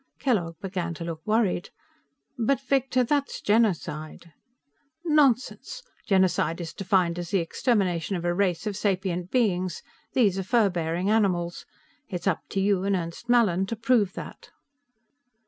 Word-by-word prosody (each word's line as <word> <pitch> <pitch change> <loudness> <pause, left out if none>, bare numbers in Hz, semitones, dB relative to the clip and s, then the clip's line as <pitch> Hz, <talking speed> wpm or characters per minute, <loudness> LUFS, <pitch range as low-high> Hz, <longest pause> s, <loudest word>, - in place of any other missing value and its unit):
Kellogg 180 - 0
began 180 -3 -4
to 165 - -6
look 165 -1 -5
worried. 215 -5 +1 0.7
"But, 240 +3 +1
Victor, 265 -1 +1
that's 280 +3 -1
genocide!" 170 -7 -1 0.7
"Nonsense! 300 - +1 0.2
Genocide 185 -4 +2
is 170 -2 -6
defined 180 -3 +1
as 175 -1 -5
the 195 - +2
extermination 185 -1 0
of 175 -1 -4
a 175 - +1
race 180 -1 0
of 210 -2 -2
sapient 185 -3 -1
beings. 185 -8 0 0.3
These 205 -7 +3
are - - -2
fur 210 0 +3
bearing 175 +3 -1
animals. 180 -6 0 0.4
It's 180 -4 -5
up 195 - +1
to 195 - -2
you 195 -1 +2
and 200 0 +1
Ernst 175 +7 -5
Mallin 195 -6 +3
to 230 - -3
prove 220 -4 +2
that." - - -9
195 Hz, 145 wpm, -26 LUFS, 175-230 Hz, 0.7 s, These